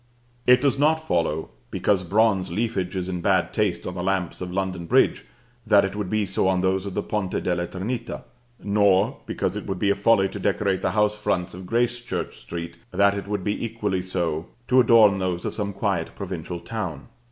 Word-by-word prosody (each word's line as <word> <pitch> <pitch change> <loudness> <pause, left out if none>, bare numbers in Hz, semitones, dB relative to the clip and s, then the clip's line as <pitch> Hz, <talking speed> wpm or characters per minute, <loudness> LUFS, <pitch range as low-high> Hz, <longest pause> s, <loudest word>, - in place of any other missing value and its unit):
It 125 0 +7
does 140 -1 +2
not 155 +2 +5
follow, 85 - -1 0.2
because 95 -3 +1
bronze 100 -1 +2
leafage 100 -2 -1
is 90 -1 -2
in 90 -2 -3
bad 95 -1 +2
taste 105 -5 0
on 90 - -4
the 90 - -4
lamps 95 -2 -1
of 90 -1 -4
London 95 -2 -3
Bridge, - - +3 0.4
that 100 -2 +6
it 95 - -4
would 105 -3 -3
be 110 0 +1
so 95 0 0
on 95 -1 +2
those 95 +1 0
of 95 - -6
the 105 - -1
Ponte 105 -3 -2
della 85 -1 0
Trinita; 115 +7 -4 0.4
nor, 100 -1 +3
because - - -2
it - - -5
would 95 - -2
be 100 +2 +2
a - - +2
folly 100 -1 +3
to - - -7
decorate 100 -1 0
the - - 0
house 105 0 +3
fronts 100 -4 -1
of 90 +1 -9
Gracechurch 120 +2 -1
Street, 85 0 -7
that 100 0 +3
it 100 0 -5
would 105 -2 -2
be 105 +3 -2
equally 105 -5 -2
so 85 -3 -2 0.2
to 130 - +5
adorn 110 -5 +6
those 90 -2 -2
of - - -2
some 100 -2 -2
quiet 100 -4 -2
provincial 85 - -5
town. 85 -6 -5
95 Hz, 200 wpm, -24 LUFS, 90-105 Hz, 0.4 s, It